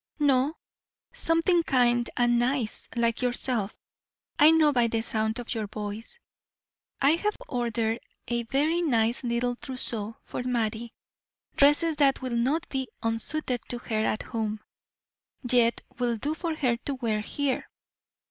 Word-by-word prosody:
"No, 285 0 +2 0.6
something 330 +2 +2
kind 240 -5 +2
and 240 -1 +3
nice, 245 -2 -1
like 235 0 +1
yourself; 245 -4 0 0.6
I 300 - +9
know 315 -2 +5
by 240 -2 +3
the 225 0 0
sound 220 0 -1
of 245 -1 -4
your 220 -3 -3
voice." 215 - -6 0.8
"I 275 - +5
have 415 +6 0
ordered 235 -2 -1 0.3
a 240 0 0
very 290 +8 +1
nice 235 -6 +1
little 240 0 -1
trousseau 235 -6 -1
for - - -5
Mattie 235 -2 -2 0.6
dresses 295 +3 +4
that 275 -2 +3
will 255 -2 -3
not 280 +8 +1
be 265 -1 -2 0.2
unsuited 240 +3 -2
to 245 - -2
her 220 -2 -2
at 215 - -1
home, 220 -2 -3 0.9
yet 235 -1 +3 0.2
will 240 -2 0
do 290 +8 -2
for 325 0 -3
her 250 -6 +1
to 275 +4 -4
wear 230 -4 -1
here. 275 +4 -2
245 Hz, 140 wpm, -27 LUFS, 230-285 Hz, 0.9 s, I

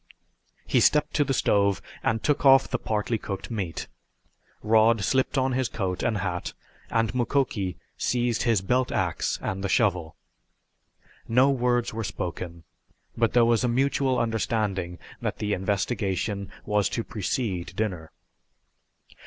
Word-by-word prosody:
He - - +2
stepped 150 - +3
to 150 - +3
the 140 - -2
stove 100 -6 +2 0.2
and 115 -1 0
took 145 - +1
off 135 -1 +7
the 130 - -2
partly 110 +1 -1
cooked 95 -2 -6
steak. 95 -7 -3 0.8
Rod 110 0 +4
slipped 130 +7 +1
on 130 0 +2
his 130 -1 0
coat 95 -4 -3
and 110 - 0
hat 90 -3 -3 0.4
and 115 0 +1
Mukoki 120 - 0 0.2
seized 120 -2 0
his 115 -5 +2
belt 125 +6 +1
ax - - -1
and 95 0 -3
the 95 - -1
shovel. 90 -8 +1 1.1
No 130 +4 +4
words 120 -3 +1
were 115 +1 -3
spoken, 85 -3 -5 0.5
but 115 -1 +1
there 120 -1 +5
was 115 +1 +3
a - - +2
mutual 130 +1 +1
understanding 105 -6 -1 0.2
that - - -2
the 105 -1 -1
investigation 100 0 -1 0.2
was 105 -1 +1
to 115 - -2
precede 95 -5 -3
dinner. 90 -7 -3
110 Hz, 140 wpm, -26 LUFS, 95-125 Hz, 1.1 s, off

